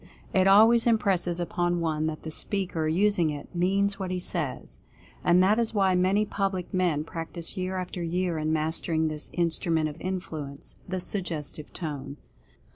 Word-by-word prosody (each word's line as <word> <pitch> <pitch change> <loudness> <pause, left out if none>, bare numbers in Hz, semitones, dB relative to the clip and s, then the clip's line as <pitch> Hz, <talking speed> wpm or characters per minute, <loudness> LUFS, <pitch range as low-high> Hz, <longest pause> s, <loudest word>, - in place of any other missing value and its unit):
It 190 0 +4
always 225 +4 +6
impresses 190 -6 +2
upon 175 0 0
one 155 -2 0
that 155 -1 -5
the 160 - -5
speaker 180 -3 -1
using 180 0 +2
it 145 -1 -7
means 195 +3 +1
what 190 -1 -3
he 185 - -2
says. 170 -6 -3 0.4
And 180 +1 +5
that 210 +4 +3
is 225 -1 0
why 195 -2 +3
many 190 +4 +2
public 195 -3 -2
men 175 -5 +1
practice 165 +1 -4
year 185 0 -3
after 180 -1 -4
year 170 0 -1
in 155 0 -1
mastering 160 0 +1
this 150 -1 -3
Instru 170 0 +1
ment 160 -1 +2
of 150 - -10
Influence 160 -6 -5
— - - -20
the 185 0 -2
Suggestive 165 -6 -4
Tone. 145 -4 -5
175 Hz, 170 wpm, -27 LUFS, 160-190 Hz, 0.4 s, always